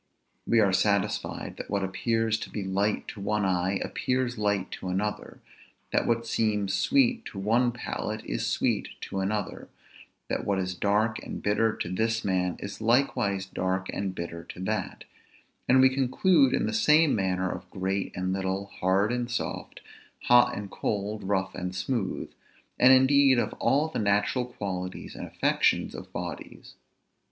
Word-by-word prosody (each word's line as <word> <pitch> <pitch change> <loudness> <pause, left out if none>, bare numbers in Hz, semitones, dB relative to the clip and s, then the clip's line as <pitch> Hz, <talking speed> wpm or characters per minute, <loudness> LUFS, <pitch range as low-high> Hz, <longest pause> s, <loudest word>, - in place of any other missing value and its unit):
We 115 - +4
are 100 -3 +3
satisfied 100 0 0
that - - -7
what 100 -1 0
appears 110 +3 0
to - - -6
be 105 - -4
light 100 +2 0
to 105 - -8
one 105 0 0
eye, 95 0 +1
appears 125 -1 -1
light 105 -3 -1
to - - -6
another; 95 +3 -3 0.5
that - - +1
what 115 0 +1
seems 105 -4 0
sweet 250 - +2
to - - -8
one 115 +5 +2
palate, 110 -2 -5
is - - -2
sweet - - 0
to 95 - -4
another; 100 +1 -3 0.6
that - - -2
what 100 -1 0
is 95 -1 -1
dark 105 +4 +1
and - - -6
bitter 105 +2 +2
to - - -4
this 110 +5 -1
man, 90 -2 0
is 100 +2 -7
likewise 110 -5 +1
dark 95 0 -2
and 95 -1 -3
bitter 85 -1 -6
to - - -10
that; 105 +3 -3 0.7
and 130 +1 +6
we 130 - +7
conclude 135 +2 +3
in - - 0
the - - -2
same 160 -8 +4
manner 95 -2 0
of - - -8
great 95 +1 -2
and 95 0 -1
little, 95 +1 -2
hard 95 +4 +2
and 120 0 -2
soft, 120 - -4 0.4
hot 120 0 +5
and 100 -1 -6
cold, 105 +1 -3
rough 95 -1 -1
and 90 0 -5
smooth; 100 0 -2 0.5
and 125 +1 +7
indeed 130 0 +6
of 120 - 0
all 145 +3 +2
the 160 - -4
natural 105 +4 +1
qualities 95 -6 -5
and - - -7
affections - - +1
of - - -9
bodies. - - -7
105 Hz, 165 wpm, -27 LUFS, 95-120 Hz, 0.7 s, we